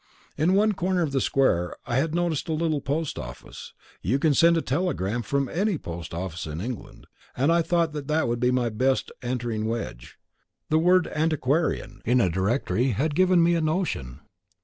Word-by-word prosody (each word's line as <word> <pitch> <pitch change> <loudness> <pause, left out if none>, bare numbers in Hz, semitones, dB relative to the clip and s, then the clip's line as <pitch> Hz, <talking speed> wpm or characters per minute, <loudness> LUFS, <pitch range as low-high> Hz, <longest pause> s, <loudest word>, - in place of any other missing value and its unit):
In 165 +6 +2
one 215 +2 +4
corner 180 -1 0
of 150 - -2
the 135 -1 +1
square 90 -10 +1
I 120 - -1
had 155 +4 0
noticed 170 -3 -1
a - - +1
little 155 -2 0
post 145 +2 -2
office. 65 -2 -9 0.3
You 115 - +1
can 150 +1 +2
send 170 +4 +5
a - - +1
telegram 125 - -1
from 140 +2 -1
any 195 - 0
post 85 - -7
office 85 -1 -5
in 75 +1 -5
England, 115 +2 -7 0.3
and 140 +6 +3
I 170 0 +4
thought 165 -1 +1
that 150 0 -1
would 120 0 -1
be 125 +1 +2
my 125 -2 +1
best 130 +4 0
entering 120 -3 -2
wedge. 110 - -5 0.5
The 155 - +4
word 180 +2 +4
"antiquarian" 155 0 0
in 125 +3 +2
the 100 -7 +3
directory 110 +7 0
had 145 +9 0
given 185 +1 +4
me 170 +1 +3
a 170 - +1
notion. 155 - -2
140 Hz, 185 wpm, -25 LUFS, 115-165 Hz, 0.5 s, send